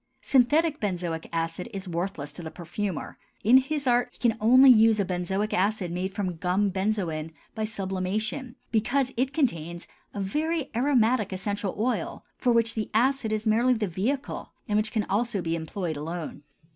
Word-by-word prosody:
Synthetic 295 +4 +3
benzoic 175 -5 -3
acid 165 +4 -3
is 195 -2 -6
worthless 170 -4 -3
to 175 - -7
the 160 - -6
perfumer; 175 +2 -5 0.2
in 235 +5 +7
his 275 +2 0
art 245 0 +3
he - - -22
can 240 - +3
use 225 - -9
only 255 +4 +8
a 220 -2 +4
benzoic 190 +3 -2
acid 195 -2 0
made 185 +2 -2
from 190 -4 -3
gum 190 +4 +1
benzoin 185 -5 -1 0.2
by 220 -1 -2
sublimation, 215 +5 -3 0.2
because 245 +4 +1
it 255 +3 0
contains 170 - -1 0.3
a - - -3
very 300 - -1
aromatic 240 -4 +2
essential 200 +1 -3
oil 240 +4 -2
for 250 - +1
which 230 -1 +3
the 220 -1 -3
acid 255 0 +2
is 215 +1 -1
merely 235 +4 +4
the 220 -2 -1
vehicle 220 +11 -3
and 210 - 0
which 215 0 +1
can 220 -3 0
also 215 +1 0
be 165 -2 -1
employed 165 +1 -4
alone. 160 0 -5
210 Hz, 170 wpm, -27 LUFS, 180-240 Hz, 0.3 s, only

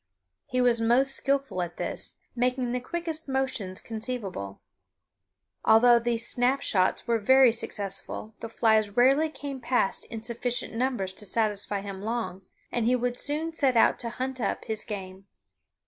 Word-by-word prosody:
He 255 0 0
was 240 -2 +3
most 260 +4 +6
skillful 275 -9 0
at 175 -1 -5
this, - - -3 0.2
making 250 0 0
the 250 - -1
quickest 325 +3 -4
motions 260 -8 -2
conceivable. 215 - -5 1.0
Although 240 +2 +6
these 230 -1 0
snap 255 +3 +2
shots 185 -2 +1
were 230 -1 +1
very 260 +2 +5
successful, 200 0 -4
the 230 - -6
flies 220 -2 +2
rarely 275 +6 +4
came 280 -3 -7
past 240 -4 0
in 225 -1 -8
sufficient 240 +1 -3
numbers 230 -6 -1
to 210 - -6
satisfy 205 -2 -1
him 195 -1 -7
long, 220 -3 -3 0.3
and 235 -2 0
he 250 - +4
would 245 0 -1
soon 305 +5 -2
set 275 -5 +2
out - - +4
to 235 - -3
hunt 260 +2 -4
up 200 - -2
his 220 -1 -3
game. 195 -2 -8
235 Hz, 155 wpm, -27 LUFS, 210-260 Hz, 1.0 s, most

